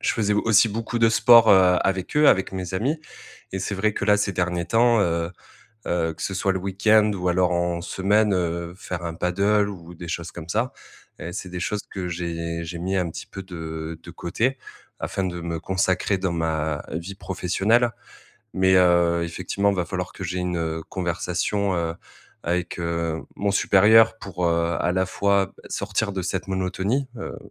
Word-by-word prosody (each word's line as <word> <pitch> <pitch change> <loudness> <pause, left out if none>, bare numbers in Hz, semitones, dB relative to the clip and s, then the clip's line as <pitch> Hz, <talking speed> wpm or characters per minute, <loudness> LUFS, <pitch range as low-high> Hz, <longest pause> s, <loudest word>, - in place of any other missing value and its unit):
Je - - +1
faisais 105 -2 +1
au 105 - +1
aussi 115 0 +5
beaucoup 115 +2 -3
de 115 -1 +5
sport, 115 0 +7
heu, 90 -2 +6
avec 95 -2 -1
eux, 150 -1 +6
avec 95 0 +3
mes 95 -1 -5
amis 140 +11 0 0.5
et 95 - -2
c'est 100 - -2
vrai 105 +2 +1
que - - -2
là, 105 0 +5
ces 100 -1 0
derniers 90 -1 -1
temps 115 0 +4
heu, 85 -2 0 0.6
heu 80 -2 0
que - - -9
ce 95 - -2
soit 95 +1 +1
le 95 - -2
week-end 105 +3 +3
ou 90 -1 -2
alors 90 0 +2
en 85 0 0
semaine, 100 +3 +2
heu, 85 -1 -2
faire 90 -2 -6
un 85 - -3
paddle 100 +4 +1
ou 85 -2 -10
des 85 0 -9
choses 85 0 -4
comme 85 -1 -9
ça 110 +7 0 0.5
et 85 - -6
c'est 95 - -6
des 90 0 -5
choses 105 +3 -2
que 95 -2 -4
j'ai 85 -1 -4
j'ai 85 +1 -6
mis 95 +3 -2
un 90 -3 0
petit - - -8
peu 95 - -8
de 80 -3 -6
de 85 - -10
côté, 115 +10 -1 0.4
afin 95 - -2
de 90 -1 -3
me 85 -1 -3
consacrer 95 +1 0
dans 95 -2 -1
ma 80 -2 -1
vie 85 +5 -5
professionnelle. 100 +5 +1 0.6
Mais, 95 0 +3
heu, 85 -1 +4
effectivement, 100 +4 -1
va 90 -3 -1
falloir 90 -2 -4
que 95 - -7
j'aie 90 +2 -3
une, 90 -1 -2
heu, 80 0 -2
conversation, 90 +2 -1
heu, 85 -1 -1 0.5
avec, 90 +1 -2
heu, 85 -1 -2
mon 100 0 0
supérieur 110 +4 +5
pour, 90 -2 -3
heu, 85 0 +1
à 90 - +1
la 95 0 +1
fois 100 0 +1 0.2
sortir 105 -3 -2
de 95 -1 -3
cette 95 +1 -3
monotonie. 95 +8 -1
Heu, - - -6
90 Hz, 190 wpm, -24 LUFS, 85-100 Hz, 0.6 s, sport